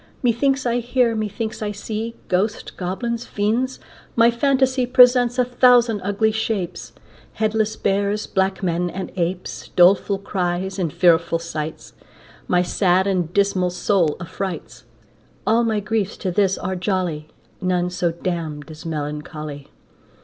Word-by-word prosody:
Methinks 255 +3 +2
I 240 0 +1
hear, 245 0 +1
methinks 215 +1 -3
I 210 -1 -2
see 220 +2 -5
Ghosts, 205 +4 -1
goblins, 230 +6 -4
fiends; 230 +6 -1 0.4
my 235 0 +5
phantasy 260 0 +2
Presents 250 -1 +5
a 250 - +3
thousand 245 -3 +4
ugly 205 +3 +1
shapes, 200 -5 -3 0.4
Headless 220 0 0
bears, 200 +1 0
black 190 0 -1
men, 175 0 0
and 190 +2 -6
apes, 175 0 -3
Doleful 190 +3 +5
outcries, 190 -1 -2
and 170 -4 -1
fearful 170 0 +3
sights, 160 -2 -6 0.5
My 180 0 +3
sad 185 0 +2
and 180 -4 0
dismal 195 -2 +2
soul 180 -3 +1
affrights. 185 +1 -6 0.6
All 230 +2 +3
my 220 -2 +1
griefs 210 -1 -2
to 185 - -2
this 195 +1 +2
are 185 +1 -3
jolly, 180 -5 -2 0.3
None 180 -1 0
so 175 -1 0
damn'd 165 -3 -4
as 155 +2 -9
melancholy. 150 -1 -5
195 Hz, 135 wpm, -21 LUFS, 175-225 Hz, 0.6 s, my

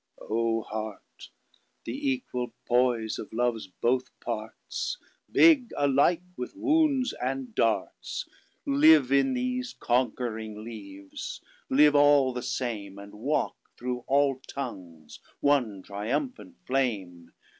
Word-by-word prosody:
O 115 0 0
Heart! 110 -1 -7 0.6
the 280 - -5 0.2
æquall 125 -1 -4
poise 120 -3 +2
of 105 - -7
love's 115 -2 0
both 125 +7 0
partsBigge 320 - +1
alike 145 +5 +3
with 125 - -6
wound 300 -4 +3 0.2
and 130 -2 -3
darts. 65 - -1 0.4
Live 145 -1 +6
in 140 - +3
these 255 0 -2
conquering 110 -3 -1
leaves; 100 -4 -8 0.3
live 150 +2 +6
all 145 -2 +5
the 125 - -3
same; 120 -6 -3
And 100 0 -11
walk 135 +8 -1 0.2
through 125 0 -3
all 135 -1 +2
tongues 90 - -7 0.2
one 125 -10 +1
triumphant 140 - -3
Flame. 100 -11 -2
125 Hz, 105 wpm, -28 LUFS, 110-145 Hz, 0.6 s, Live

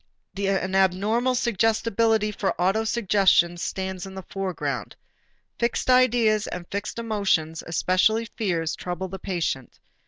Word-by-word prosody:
An 195 -1 -1
abnormal 205 +7 +2
suggestibility 225 -1 +1
for 200 -1 -2
autosuggestions 195 -2 +2
stands 190 +1 -4
in 190 - -10
the 190 - -7
foreground. 190 -2 -4 0.6
Fixed 235 +2 +1
ideas 235 -4 +3
and 175 - -6
fixed 200 +3 -4
emotions, 200 -8 0
especially 185 +7 +2
fears, 175 -8 -2
trouble 180 +1 -5
the 190 +1 -7
patient. 170 -9 -3
195 Hz, 115 wpm, -25 LUFS, 185-225 Hz, 0.6 s, ideas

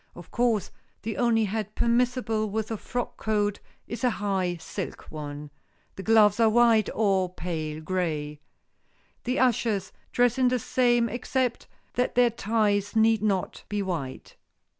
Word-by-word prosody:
Of 175 - -12
course, 235 -3 +1 0.3
the 220 -1 -3
only 235 -2 +3
hat 215 0 -3
permissible 235 -2 +1
with 220 +2 -3
a 225 - -2
frock 245 +4 -4
coat 210 -2 0 0.3
is 235 - -6
a 250 - +4
high 195 -5 -1
silk - - -7
one. 145 -1 -7 0.4
The - - -6
gloves 210 +1 +4
are 225 -1 +5
white, 225 -2 +4
or 195 -4 +2
pale 155 -4 -4
gray. 155 -4 -2 0.9
The 250 +1 0
ushers' 225 -6 +1 0.2
dress 245 +1 +2
is 255 -1 +4
the 255 - +1
same 240 0 +2
except 245 +1 -2 0.3
that 250 +1 0
their 245 -1 +5
ties 210 -2 0
need 220 -1 +4
not 200 -4 -1
be 205 -1 -1
white. 160 -9 -5
215 Hz, 145 wpm, -26 LUFS, 190-235 Hz, 0.9 s, are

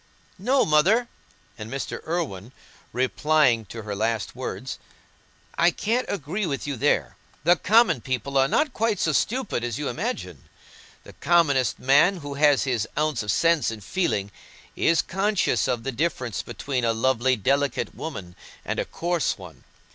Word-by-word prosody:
"No, 265 +1 +2
Mother," 195 +11 +3 0.5
and 105 +1 -7
Mr. 135 +2 -4
Irwine, 135 - -3 0.4
replying 130 -2 +2
to 115 +3 -8
her 105 -1 -4
last 110 +1 -1
words; - - -5 0.8
"I 170 - +6
can't 230 +8 -1
agree 190 +3 -2
with 140 -3 -3
you 145 -1 -3
there. 115 - 0 0.3
The 175 +3 +5
common 210 - +3
people 130 +2 -3
are 135 0 +4
not 300 - +1
quite 225 -1 0
so 160 - +1
stupid 215 - -1
as 120 -2 -2
you 150 - -2
imagine. 230 - -4 0.6
The - - -13
commonest 145 -8 +2
man, 145 +9 +4
who 145 -4 -7
has 145 -1 +4
his 120 -5 -1
ounce 150 -4 0
of 105 -1 -1
sense 165 +2 +2
and 110 -2 -7
feeling, 100 - -1 0.4
is 165 0 +2
conscious 195 +2 0
of 120 -2 -1
the 135 - -2
difference 125 - -2
between 130 -3 -4
a 115 -1 +2
lovely, 130 +2 +2
delicate 140 +4 0
woman 95 - -7 0.3
and - - -2
a - - -1
coarse 175 -2 -1
one. - - -13
140 Hz, 155 wpm, -24 LUFS, 120-175 Hz, 0.8 s, I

